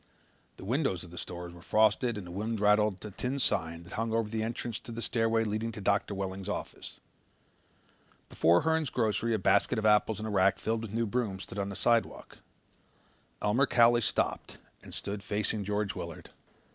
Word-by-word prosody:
The - - -10
windows 120 - 0
of 85 - -12
the 90 - -11
stores 85 -1 -7
were 85 - -13
frosted 110 +4 +2
and 100 - -6
the 90 - -9
wind 110 +4 -3
rattled 105 -1 +3
the 105 - -7
tin 125 +7 -3
sign 85 -9 0
that 85 - -12
hung 115 0 -2
over 115 -1 +1
the 110 +1 -3
entrance 115 0 -3
to - - -10
the 115 - -6
stairway 115 -1 +1
leading 110 +1 -2
to - - -7
Doctor 100 +1 0
Welling's 95 0 -4
office. - - -6 1.3
Before 85 +2 +3
Hern's 160 -3 +1
Grocery 115 -1 0
a - - +1
basket 100 +4 +2
of 110 - -1
apples 105 0 +4
and 110 +1 -4
a - - -3
rack 95 -1 +3
filled 110 0 -1
with 115 -3 -6
new 115 +2 0
brooms 105 -4 -2
stood 100 - -7
on 100 0 -2
the 100 - -6
sidewalk. 115 +2 0 1.0
Elmer 120 +7 +3
Cowley 120 -1 +5
stopped - - -1 0.2
and - - -12
stood 100 0 -5
facing 105 +1 -1
George 105 +1 -1
Willard. 85 -1 -8
105 Hz, 190 wpm, -30 LUFS, 100-115 Hz, 1.3 s, Cowley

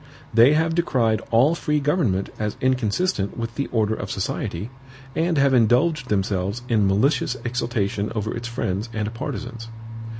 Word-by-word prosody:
They 115 +6 +7
have 160 +1 +2
decried 125 -10 +1
all 125 +8 +4
free 150 -3 0
government 140 - 0
as 105 -1 -2
inconsistent 125 - 0
with 115 0 -4
the 140 +2 -2
order 110 -2 +1
of 95 -3 -5
society, 95 +2 -3 0.4
and 165 0 +1
have 140 -1 +4
indulged 125 +4 +3
themselves 100 +2 -1
in 110 -5 +2
malicious 125 +6 +1
exultation 115 -4 -1
over 110 0 -2
its 120 0 -5
friends 115 -2 -3
and 110 0 -2
partisans. 115 0 -6
115 Hz, 145 wpm, -23 LUFS, 105-135 Hz, 0.4 s, They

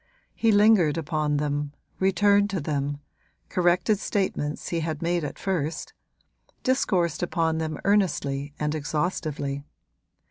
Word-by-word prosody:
He 225 - +2
lingered 205 -7 +5
upon 155 -2 0
them, 145 0 -2 0.3
returned 200 +2 +3
to 195 -2 -2
them, 145 -1 -2 0.5
corrected 180 +3 +2
statements 185 -9 -2
he 170 - -1
had 160 -1 -3
made 170 0 0
at 145 - -5
first, 165 -4 -2 0.7
discoursed 185 - +1
upon 165 -2 0
them 155 -2 -3
earnestly 145 -8 +1
and 150 0 0
exhaustively. 150 -2 -2
165 Hz, 115 wpm, -26 LUFS, 150-190 Hz, 0.7 s, lingered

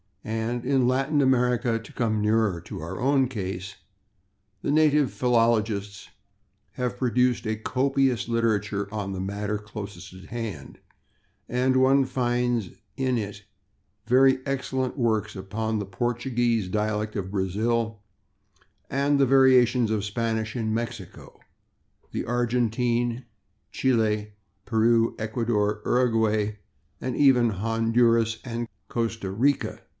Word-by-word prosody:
And 115 +2 -3
in 130 -2 +2
Latin 135 +3 +1
America, 125 -3 +2
to 115 - -14
come 110 -3 0
nearer 105 -4 +1
to - - -8
our 85 +4 -6
own 135 0 +3
case, 95 -5 -5 0.9
the - - -1
native 150 -2 +3
philologists 110 -4 0 0.6
have 125 -1 -3
produced 125 -1 +1
a 110 0 0
copious 130 +1 0
literature 100 -3 0
on 100 -2 -3
the 95 - -5
matter 100 +2 -2
closest 105 -4 -9
at 95 0 -12
hand, 110 - -6 0.7
[Pg006] 125 +1 0
and 130 0 +3
one 135 +1 +4
finds 120 -4 0 0.3
in 130 -2 +1
it 105 -2 -5 0.6
very 130 +2 +4
excellent 130 -1 -2
works 110 -4 0
upon 110 +3 -3
the 105 - -3
Portuguese 120 0 -1
dialect 105 +2 -1
of 95 -2 -3
Brazil, 110 +3 -1 0.9
and 140 +1 +1
the 135 - +5
variations 130 -3 +5
of 105 -2 0
Spanish 110 +1 -2
in 110 -3 -1
Mexico, 115 -5 -6 0.7
the - - -3
Argentine, 120 0 0 0.5
Chili, 110 -4 0 0.3
Peru, 115 0 +2
Ecuador, 110 -2 -1
Uraguay 110 -4 +1 0.4
and 130 -2 -3
even 125 -4 +5
Honduras 115 +2 +2
and 120 -1 -4 0.2
Costa 115 -4 -2
Rica. 130 +8 0
115 Hz, 120 wpm, -25 LUFS, 105-125 Hz, 0.9 s, the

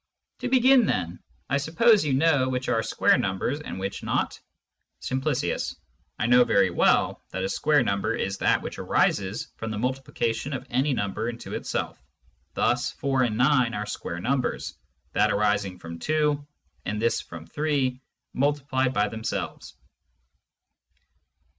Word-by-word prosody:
To - - -2
begin 255 -1 +5
then: 85 -1 -1 0.3
I 140 - +1
suppose 200 - +4
you 145 -3 0
know 140 -3 +3
which 130 0 -2
are 115 - +2
square - - +3
Numbers, 95 +9 -1
and 95 - -6
which 95 +1 -4
not? - - 0
^^ - - -11 0.7
Simp. 130 +1 -1 0.4
I - - -1
know 125 +1 +6
very 100 -5 +3
well - - +2
that 95 0 -4
a 95 - -1
square 150 +3 +2
Number 100 -3 0
is 95 +1 -3
that - - +2
which - - -6
arises 95 +2 0
from 110 - -4
the 110 - -3
Multiplication 130 +1 -2
of 130 0 -4
any 135 +4 +2
Number 105 +2 -2
into 120 0 -7
itself; - - -3 0.5
thus 120 0 +1
4 135 -2 0
and 115 -4 +1
9 125 -2 +3
are 105 0 -3
square 90 -4 -5
Numbers, 130 +6 -1 0.4
that - - +3
arising 100 -2 +1
from 85 -1 -9
2, 150 - 0 0.4
and 105 +1 -3
this 115 +1 +1
from 85 -2 -10
3, 135 - -1 0.3
multiplied 135 -2 0
by 105 0 +3
themselves. 110 +2 -5
125 Hz, 150 wpm, -26 LUFS, 105-140 Hz, 0.7 s, know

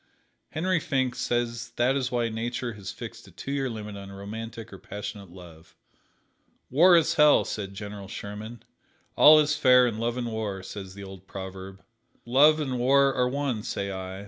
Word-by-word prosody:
Henry 180 +2 0
Finck 130 -4 -1
says 120 -1 -2
that 125 +3 +2
is 130 -2 -1
why 120 -1 0
Nature 120 +2 -3
has 100 -2 -7
fixed - - -9
a - - -15
two 135 - -7
year 135 -2 -1
limit 105 -2 -7
on 100 0 -9
romantic 110 +3 -8
or 95 - -10
passionate 100 0 -7
love. 85 -2 -14 1.0
"War 170 +6 +7
is 165 - +2
hell," 150 -1 +5
said 100 -2 -5
General 100 -1 -7
Sherman. 105 +3 -8 0.5
"All 155 +1 +8
is 150 0 +2
fair 125 -4 +6
in 115 -3 -2
Love 120 +1 -1
and 120 -2 -3
War," 105 -4 -4
says 95 -1 -8
the 100 - -9
old 95 -1 -11
proverb. 95 0 -8 0.4
Love 145 +6 +5
and 130 -5 -2
War 135 +2 +4
are 125 -1 +1
one, 135 -4 -2
say 100 -1 -4
I. 95 0 -6
115 Hz, 175 wpm, -26 LUFS, 100-130 Hz, 1.0 s, All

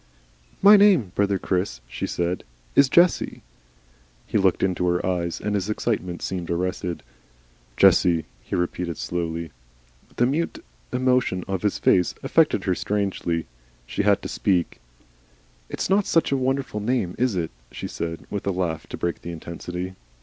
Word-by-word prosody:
"My 205 +1 +10
name, 190 - +5
brother 100 -1 +1
Chris," 90 -8 -1
she - - -4
said, 85 +1 -2 0.3
"is 140 -1 +6
Jessie." 175 +4 +3 0.8
He - - -8
looked 95 -2 +2
into 90 -1 +1
her 90 0 +1
eyes, 85 -2 -1
and 105 - -2
his 100 0 -1
excitement 100 -5 -2
seemed 90 -3 -3
arrested. 90 0 -2 0.7
"JESSIE," 85 -3 +5 0.2
he - - -4
repeated 90 -1 -2
slowly. 85 -2 -3 0.6
The 120 - +3
mute 150 +7 -1 0.3
emotion 125 -7 +1
of 95 -2 -2
his 105 - 0
face 90 -1 +3
affected - - +3
her - - +1
strangely. 95 -5 -1 0.4
She - - -2
had - - +3
to - - -3
speak. 90 -3 0 0.9
"It's - - -2
not 195 +1 +2
such 165 - +2
a - - +3
very 130 -1 -1
wonderful 135 -5 -1
name, 105 -5 0
is 125 -4 +2
it?" 85 -3 -2 0.2
she - - -5
said, 80 -1 -5
with 100 -1 -4
a - - +3
laugh 90 -4 -2
to - - -6
break 85 -1 -2
the 85 - -6
intensity. 90 +2 -6
95 Hz, 155 wpm, -24 LUFS, 85-120 Hz, 0.9 s, My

